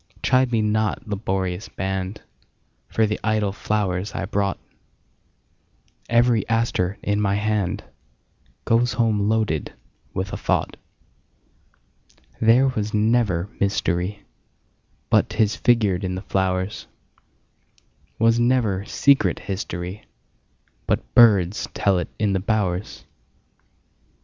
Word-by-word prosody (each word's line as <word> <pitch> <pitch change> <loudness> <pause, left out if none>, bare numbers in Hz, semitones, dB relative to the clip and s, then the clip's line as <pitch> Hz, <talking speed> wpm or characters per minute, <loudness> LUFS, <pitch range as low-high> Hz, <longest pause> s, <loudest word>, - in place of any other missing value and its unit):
Chide 130 -1 +3
me 110 -2 +1
not, 110 +3 -1
laborious 95 -2 -3
band, 95 +1 -4 0.6
For 110 - +1
the 105 0 -2
idle 110 -2 +1
flowers 100 -1 -2
I - - -2
brought; 100 -1 -1 1.5
Every 120 -1 +3
aster 115 -5 0
in 105 0 0
my 100 -1 +1
handGoes 110 +3 -3
home 110 -3 +1
loaded 110 -9 0 0.4
with 95 +1 -4
a - - -2
thought. - - -1 1.6
There 120 +4 +5
was 110 -4 -3
never 105 -5 +1
mysteryBut 100 -1 0 1.1
'tis 110 -2 +1
figured 110 -6 +2
in 90 -1 -2
the 95 - -6
flowers; 95 0 -1 1.3
SWas 115 +1 +4
never 120 -6 +1
secret 140 +4 +3
historyBut 95 0 -5 1.1
birds 105 -6 +5
tell 95 -3 +2
it 90 - -4
in 105 -2 +1
the 95 - +1
bowers. 100 -2 -2
105 Hz, 100 wpm, -23 LUFS, 95-110 Hz, 1.6 s, There